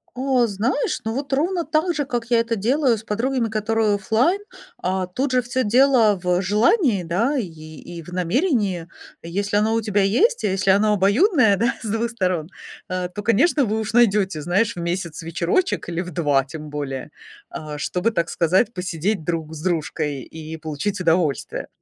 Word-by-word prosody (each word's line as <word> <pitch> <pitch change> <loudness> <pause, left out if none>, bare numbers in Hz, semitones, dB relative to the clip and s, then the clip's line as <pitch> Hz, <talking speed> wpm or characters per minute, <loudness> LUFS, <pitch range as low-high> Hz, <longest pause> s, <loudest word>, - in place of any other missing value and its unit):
О, 255 -1 +2
знаешь, 230 +7 -1
ну, 225 - -2
вот 275 +2 -4
ровно 340 +5 +1
так 315 +3 0
же, 295 -2 -1
как 240 -3 -3
я 235 - +4
это 230 0 -1
делаю 245 +3 +2
с 215 - -11
подругами, 235 +3 -1
которые 220 0 +1
оффлайн. 225 - +1 0.4
А, 185 0 -1
тут 255 +9 -2
же 255 - +4
всё 250 +1 -1
дело 230 -3 +4
в 180 0 +1
желании, 210 - +2
да, 225 - 0
и 230 - -1
и 155 +1 -10
в 155 - -17
намерении. 190 - 0 0.3
Если 200 +4 -2
оно 220 +2 +2
у 225 - +2
тебя 205 -2 +1
есть, 370 - +2
и - - +3
если 190 0 +1
оно 210 +2 +4
обоюдное, 220 - +4
да, 235 +4 +1
с 225 - -4
2 225 +2 -1
сторон, 185 -8 -1 0.4
а, 185 -1 -2
то, 195 +3 -7
конечно, 270 - +3
вы 220 -1 -1
уж 220 +1 -3
найдёте, 205 -8 +3
знаешь, 200 +8 +1
в 175 - -6
месяц 170 -1 -3
вечерочек 170 - -1
или 170 0 -2
в 180 0 -5
2 145 -5 +1
тем 150 +2 -9
более, 140 -3 -5 0.4
а, 150 -1 -7
чтобы, 180 +8 0
так 170 -7 -1
сказать, 185 +7 +2
посидеть 180 +1 -2
друг 160 -2 -3
с 155 - -8
дружкой 155 -5 -2
и 160 +2 -8
получить 160 +6 -4
удовольствие. 165 -4 0
205 Hz, 180 wpm, -22 LUFS, 170-235 Hz, 0.4 s, я